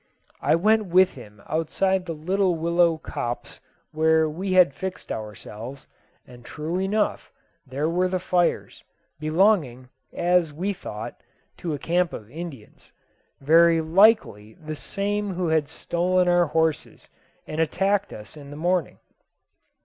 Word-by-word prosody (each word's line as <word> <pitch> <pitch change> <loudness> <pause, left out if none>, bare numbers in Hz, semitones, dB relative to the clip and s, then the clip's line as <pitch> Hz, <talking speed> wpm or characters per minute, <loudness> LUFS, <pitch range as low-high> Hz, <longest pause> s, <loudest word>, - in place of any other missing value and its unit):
I - - +3
went 215 +5 +3
with 185 +1 +4
him 105 -5 -14
outside 185 +4 0
the 165 - -4
little 185 +3 0
willow 170 0 +2
copse 120 -6 -5 0.3
where 160 0 +3
we 185 +5 -3
had 180 -6 +5
fixed 190 +3 -6
ourselves, 110 +4 -7 0.4
and 120 -1 -15
true 160 +7 -4
enough 205 +3 -1 0.4
there 140 +4 -2
were 180 +3 +1
the 185 0 -1
fires, 180 -1 -1 0.4
belonging, 155 - +1 0.2
as 175 -2 +1
we 185 +7 -2
thought, 105 - -8 0.4
to 165 -4 -3
a - - -5
camp 175 +4 0
of 110 +1 -9
Indians 155 -9 -10 0.5
very 165 +3 +5
likely 160 - +3
the 155 -1 -7
same 200 +3 -3
who 175 -2 -1
had 160 -2 +2
stolen 180 +2 0
our 175 -1 +4
horses 160 0 -1 0.4
and 155 +1 -3
attacked 195 +5 0
us 105 +6 -10
in 145 -2 -11
the 145 - -9
morning. 175 -1 0
165 Hz, 135 wpm, -24 LUFS, 150-185 Hz, 0.5 s, had